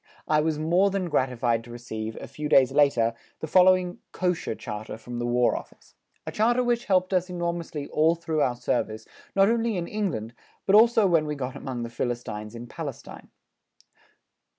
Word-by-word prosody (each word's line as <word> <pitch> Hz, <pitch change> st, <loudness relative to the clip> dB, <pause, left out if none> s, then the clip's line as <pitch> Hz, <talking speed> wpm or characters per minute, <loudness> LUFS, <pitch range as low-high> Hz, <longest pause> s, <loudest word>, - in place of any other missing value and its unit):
I 150 Hz, 0 st, +3 dB
was 155 Hz, -1 st, 0 dB
more 175 Hz, +6 st, +3 dB
than 190 Hz, -2 st, -2 dB
gratified 120 Hz, -4 st, 0 dB
to 120 Hz, -, -14 dB
receive, 110 Hz, -2 st, -6 dB
a -, -, -8 dB
few 150 Hz, 0 st, -5 dB
days 130 Hz, -2 st, +5 dB
later, 135 Hz, -5 st, +3 dB, 0.3 s
the -, -, -4 dB
following 185 Hz, +1 st, +4 dB
"Kosher" 180 Hz, -10 st, -1 dB
charter 110 Hz, 0 st, -6 dB
from 120 Hz, +1 st, -7 dB
the 120 Hz, -, -1 dB
War 120 Hz, 0 st, +2 dB
Office -, -, -10 dB, 0.3 s
a -, -, -4 dB
charter 240 Hz, +4 st, +2 dB
which 240 Hz, -1 st, 0 dB
helped 185 Hz, -1 st, +2 dB
us 185 Hz, 0 st, +1 dB
enormously 170 Hz, -4 st, -3 dB
all 160 Hz, +2 st, +3 dB
through 160 Hz, -2 st, -2 dB
our 125 Hz, -3 st, +1 dB
service, 110 Hz, -2 st, -2 dB, 0.3 s
not 195 Hz, 0 st, +5 dB
only 230 Hz, -2 st, +1 dB
in 170 Hz, -1 st, -3 dB
England, 170 Hz, -, -3 dB, 0.3 s
but 195 Hz, -, +2 dB
also 225 Hz, 0 st, +6 dB
when 165 Hz, -4 st, +3 dB
we 150 Hz, -, -2 dB
got 130 Hz, -1 st, -5 dB
amongst 130 Hz, -4 st, -5 dB
the 115 Hz, -, -5 dB
Philistines 115 Hz, -3 st, -4 dB
in 120 Hz, +1 st, -7 dB
Palestine. -, -, -8 dB
150 Hz, 175 wpm, -26 LUFS, 120-185 Hz, 0.3 s, also